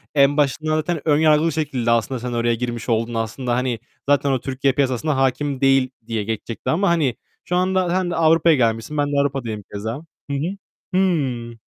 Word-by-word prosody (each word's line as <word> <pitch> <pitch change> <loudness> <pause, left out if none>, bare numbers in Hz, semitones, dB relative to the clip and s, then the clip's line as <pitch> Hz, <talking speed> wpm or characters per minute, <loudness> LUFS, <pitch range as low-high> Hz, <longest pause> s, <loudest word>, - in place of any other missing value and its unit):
en 140 +1 +4
başında 155 +2 +1
zaten 155 0 -1
ön 145 -1 +4
yargılı 155 0 +4
bir 165 - +1
şekilde 135 -6 -1
aslında 115 +2 +1
sen 125 0 -4
oraya 120 0 +1
girmiş 120 0 -4
oldun. 115 +1 0
Aslında, 120 +2 -2
hani 125 -3 -1 0.3
zaten 140 -1 +3
o 130 - +1
Türkiye 135 +1 0
piyasasına 135 +1 0
hâkim 135 +1 0
değil 135 -1 +4 0.2
diye 110 -3 -2
geçecekti 110 +1 -4
ama 190 +4 +2
hani 155 -8 +1 0.3
şu 180 - -1
anda 185 0 +1
sen 180 0 0
de - - -2
Avrupa'ya 165 0 +4
gelmişsin. 115 +3 0
Ben 145 0 +2
de 140 - +2
Avrupa'dayım 120 -7 -3
keza. 110 +4 -3 0.4
Hı - - -1
hı. 180 +8 -3 0.4
Hı. 135 -11 0
135 Hz, 190 wpm, -21 LUFS, 120-155 Hz, 0.4 s, en